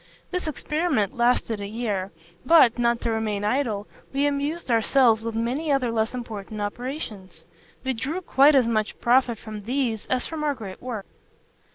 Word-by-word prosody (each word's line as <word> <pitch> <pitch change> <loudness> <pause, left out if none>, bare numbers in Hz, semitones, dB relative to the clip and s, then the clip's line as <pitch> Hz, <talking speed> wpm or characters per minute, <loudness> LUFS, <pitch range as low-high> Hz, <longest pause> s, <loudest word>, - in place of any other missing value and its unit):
This 360 -2 -2
experiment 300 - -1
lasted 235 -2 +1
a 200 - -4
year; 205 -3 -3 0.3
but, 255 -5 +6
not 235 0 +2
to 230 - -1
remain 215 -2 -1
idle, 215 -3 0 0.3
we 275 +1 +1
amused 290 +1 -1
ourselves 230 0 +4
with 230 -1 -4
many 255 +7 -1
other 260 -4 +2
less 220 +2 0
important 215 -3 -6
operations. 205 - -5 0.4
We 265 0 0
drew 280 +10 -3
quite 285 -3 +5
as 255 -4 +4
much 215 -2 -1
profit 245 -1 +3
from 215 0 -8
these 240 -3 -1
as 255 -1 0
from 320 -2 -4
our 290 -2 +1
great 200 -6 -9
work. 235 -5 -5
235 Hz, 165 wpm, -25 LUFS, 215-275 Hz, 0.4 s, but